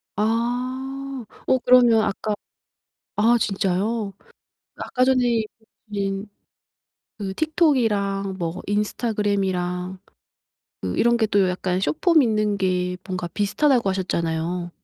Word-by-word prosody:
아. 255 +4 -2 0.2
어 260 - +4
그러면 245 -2 +6
아까 210 +2 -1 0.8
아 230 +3 +4
진짜요? 200 +1 -1 0.6
아까 255 - 0
전에 255 -1 +3
해 235 -2 +2 0.5
주신그 200 0 -4 0.9
틱톡이랑 215 - +1
뭐 170 0 -3
인스타그램이랑 195 -4 -1 0.8
그 90 -1 -3
이런 235 0 +4
게 225 -2 +2
또 200 -3 +3
약간 180 0 -1
숏폼 310 - +3
있는 215 -3 +1
게 180 -1 0
뭔가 185 -2 -3
비슷하다고 230 - +1
하셨잖아요. 175 -1 -2
205 Hz, 220 characters per minute, -23 LUFS, 185-240 Hz, 0.9 s, 그러면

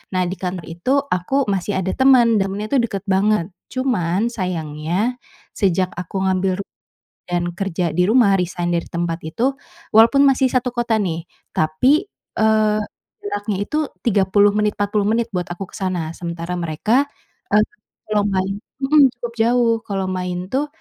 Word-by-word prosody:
Nah, 185 - +2
di 185 - -3
kantor 180 -2 -4
itu 175 +11 -1
aku 270 +8 0
masih 195 0 -1
ada 190 0 -1
teman, 245 -4 +5
dan 195 0 0
rumahnya 205 +2 -4
tuh 275 - +4
deket 200 -4 -3
banget 195 -2 +2 0.2
cuman 225 -6 0
sayangnya, 180 +1 -2 0.4
sejak 185 -2 +1
aku 180 +2 -4
ngambil 185 0 0
ru 200 - -4 0.7
dan 175 0 -1
kerja 175 -3 -2
di 180 - +3
rumah 215 -1 +4
resign 175 -1 -2
dari 170 - 0
tempat 170 -1 -2
itu. 230 - -1 0.4
Walaupun 230 +5 +6
masih 265 -1 +3
satu 255 0 +1
kota 235 -2 +1
nih 170 -5 -2 0.3
tapi, 255 - +3 0.3
eee, 215 -1 +3 0.4
jaraknya 205 0 -3
itu 300 +7 -1 0.2
30 205 -2 +3
menit 210 0 0
40 205 0 0
menit 230 +1 0
buat 180 -2 -2
aku 175 +2 -7
ke - - -11
sana. 180 -4 -2
Sementara 170 +1 -5
mereka, 215 - +1 0.5
eee, 210 - +6 0.5
kalau 210 -1 +3
main 195 +1 -1 0.2
hmm, 290 +2 +6
cukup 240 -1 -6
jauh, 235 0 +3
kalau 195 -2 -2
main 180 0 -4
tuh, 280 +3 0
195 Hz, 160 wpm, -20 LUFS, 180-230 Hz, 0.7 s, Walaupun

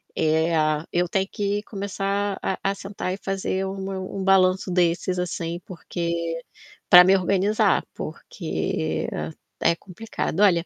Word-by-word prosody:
eh, 160 +1 +2
a 155 0 +1
eu 175 0 +1
tenho 190 +2 0
que 205 0 -1
começar 200 0 -2
a 190 - -1
a 195 0 0
sentar 195 -2 -4
e - - -4
fazer 195 -1 -2
um 195 +1 -4
meu 190 -1 -5
um 195 - -2
balanço 190 -1 +4
desses, 180 0 +1
assim 170 -1 -3
porque 170 -2 -3 0.5
pra 180 0 +11
me 190 - +6
organizar, 195 +3 +2
porque 80 0 -3 0.5
é - - +4
complicado. 195 0 -4
Olha, 175 -4 +4
185 Hz, 140 wpm, -24 LUFS, 170-195 Hz, 0.5 s, pra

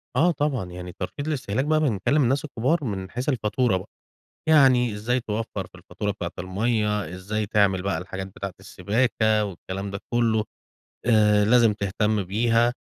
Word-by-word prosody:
آه 170 +7 +4
طبعًا، 145 - -1
يعني 90 0 -7
ترشيد 140 +10 -5
الاستهلاك 130 -4 -1
بقى 155 +1 +3
بنكلِّم 140 +1 +2
الناس 135 +5 +1
الكبار 145 +4 0
من 95 -5 -4
حيث 125 +4 -2
الفاتورة 115 -3 +1
بقى، 90 - -9 0.6
يعني 130 -6 +5
إزَّاي 120 +5 0
توفَّر 110 0 -4
في - - -19
الفاتورة 105 -1 -4
بتاعة 90 -3 -5
الميَّة، 105 0 0
إزَّاي 105 +3 -3
تعمل 100 -3 +2
بقى 100 0 -1
الحاجات 95 +1 -6
بتاعة 95 -1 -7
السباكة 110 +1 +1
والكلام 95 +1 -6
ده 100 - -5
كلّه، 115 -2 +2 0.6
آآ، 105 -3 +4
لازم 115 0 +5
تهتم 105 +1 0
بيها، 115 +5 +2
110 Hz, 155 wpm, -24 LUFS, 100-125 Hz, 0.6 s, يعني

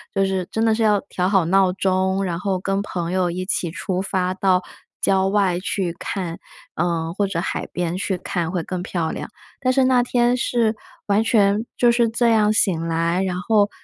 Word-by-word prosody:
就 195 - +3
是 190 -2 -2
真 220 - -1
的 225 -1 +3
是 225 +1 0
要 210 -2 +3
调 180 0 0
好 190 -2 +3
闹 185 +2 +3
钟， 190 0 0
然 175 -3 -2
后 190 0 -1
跟 195 +1 -1
朋 175 -4 -4
友 185 -1 +1
一 180 +2 -4
起 180 -3 -1
出 185 +2 -3
发 185 -1 -1
到 185 -1 +2 0.4
郊 190 -1 +2
外 195 -3 +1
去 185 -2 -2
看， 175 -4 -4 0.4
呃， 165 -1 -1
或 205 - +1
者 170 -3 -2
海 - - -3
边 175 0 -2
去 190 0 -2
看 170 -2 -3
会 175 - -1
更 180 +1 -4
漂 170 -3 -2
亮。 - - -6 0.3
但 255 -1 +1
是 265 0 +3
那 255 -1 +4
天 245 0 +2
是 230 -3 0 0.3
完 205 +1 +3
全 215 -1 +2
就 240 -1 +5
是 235 0 +3
这 235 +1 +1
样 215 -2 +3
醒 165 -6 +1
来， 165 +2 0
然 185 -2 -2
后 205 +1 +3
190 Hz, 215 characters per minute, -21 LUFS, 180-210 Hz, 0.4 s, 就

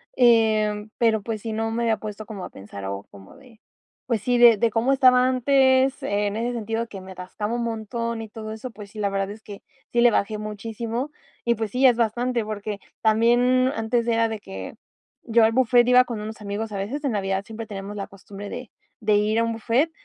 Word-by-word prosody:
em, 215 -3 +3
pero, 225 -2 +2
pues, 215 0 -4
sí, 225 - -4
no 225 +1 -2
me 235 +1 -1
había 225 -2 +2
puesto 215 0 -7
como 200 -3 -7
a - - -8
pensar, 100 0 -9
o 100 +1 -4
como 95 -1 -14
de, 250 -5 -18 0.5
pues 230 -4 -1
sí, 245 +2 +1
de 240 -2 +8
de 225 +2 +1
cómo 235 +5 +2
estaba 255 -1 +5
antes, 260 +1 +3
en 205 +1 -1
ese 240 +2 -1
sentido 225 0 -2
que 195 -3 -9
me 190 0 -11
atascaba 190 +4 -5
un 240 - -1
montón 230 0 -3
y 220 - -8
todo 215 0 -7
eso. 235 +3 -7
Pues 210 -3 -11
sí, 215 - -9
la 200 - +1
verdad 195 0 -1
es 215 +2 -10
que 205 -1 -10 0.3
sí 240 - +1
le 240 - +7
bajé 210 +1 0
muchísimo 225 +5 -4 0.3
y, 235 0 +2
pues 220 -1 -3
sí, 255 +4 +2
es 245 -3 +6
bastante, 240 +1 0
porque 210 -1 -5 0.2
también 245 +4 +3
antes 230 +1 0
era 230 -1 +2
de 220 -1 -4
que, 95 - -8 0.5
yo 230 0 +5
al 220 - +5
buffet, 245 0 +4
iba 250 +1 +6
con 230 -3 -5
unos 215 +1 -7
amigos 210 +1 -4
a 200 - -4
veces 235 +10 -4
en 275 - 0
Navidad 195 -1 -1
siempre 225 +1 -7
tenemos 200 0 -7
la 200 - -4
costumbre 200 +1 -10
de 250 -4 -7 0.3
de 215 -1 +1
ir 210 +2 +2
a 230 - +3
un 230 - -1
buffet, 235 +8 +1
225 Hz, 220 wpm, -24 LUFS, 210-240 Hz, 0.5 s, de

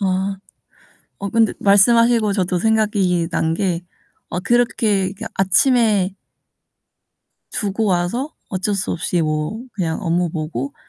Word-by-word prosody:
와. 190 0 -1 0.8
어 200 - -3
근데 225 +1 +2
말씀하시고 225 +2 +4
저도 185 -2 0
생각이 205 -5 +1
난 160 -1 0
게 175 -2 -1 0.5
어 175 - -3
그렇게 210 -4 +1
그 195 - -10
아침에 200 -1 +3 1.4
두고 205 0 -1
와서 195 - -1
어쩔 195 +2 -1
수 195 - -2
없이 170 +1 -1
뭐 155 +6 -2
그냥 170 -6 -2
업무 175 0 +1
보고 155 -4 -4
195 Hz, 220 characters per minute, -20 LUFS, 175-215 Hz, 1.4 s, 말씀하시고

